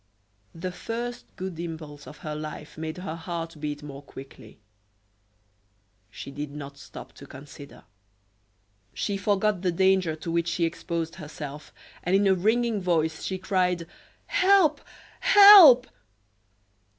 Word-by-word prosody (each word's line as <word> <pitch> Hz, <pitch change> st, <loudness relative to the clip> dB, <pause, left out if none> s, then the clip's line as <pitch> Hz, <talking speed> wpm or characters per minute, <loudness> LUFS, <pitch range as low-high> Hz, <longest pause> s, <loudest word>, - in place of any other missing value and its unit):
The 180 Hz, +3 st, -5 dB
first 240 Hz, +5 st, -6 dB
good 185 Hz, -3 st, -6 dB
impulse 160 Hz, -4 st, -8 dB
of 150 Hz, -, -11 dB
her 155 Hz, -, -4 dB
life 150 Hz, 0 st, -8 dB
made 160 Hz, +1 st, -6 dB
her 180 Hz, -3 st, -6 dB
heart 165 Hz, -1 st, -6 dB
beat 145 Hz, 0 st, -5 dB
more 140 Hz, -1 st, -9 dB
quickly. 135 Hz, -1 st, -13 dB, 1.5 s
She 140 Hz, -, -9 dB
did 145 Hz, +1 st, -6 dB
not 140 Hz, -1 st, -9 dB
stop -, -, -11 dB
to -, -, -13 dB
consider; 140 Hz, +1 st, -13 dB, 1.1 s
she 200 Hz, -, -2 dB
forgot 200 Hz, -1 st, 0 dB
the 185 Hz, -2 st, 0 dB
danger 190 Hz, -2 st, +2 dB
to 165 Hz, +2 st, -6 dB
which 170 Hz, 0 st, 0 dB
she 170 Hz, 0 st, 0 dB
exposed 165 Hz, 0 st, -4 dB
herself, 150 Hz, -2 st, -9 dB, 0.3 s
and 180 Hz, +2 st, 0 dB
in 200 Hz, +1 st, +3 dB
a 195 Hz, -, +4 dB
ringing 220 Hz, +3 st, 0 dB
voice 160 Hz, -3 st, 0 dB
she 190 Hz, -, -3 dB
cried: 180 Hz, -2 st, -1 dB, 0.4 s
"Help! 365 Hz, -6 st, +3 dB, 0.4 s
help!" 400 Hz, -, +9 dB
170 Hz, 130 wpm, -26 LUFS, 155-195 Hz, 1.5 s, help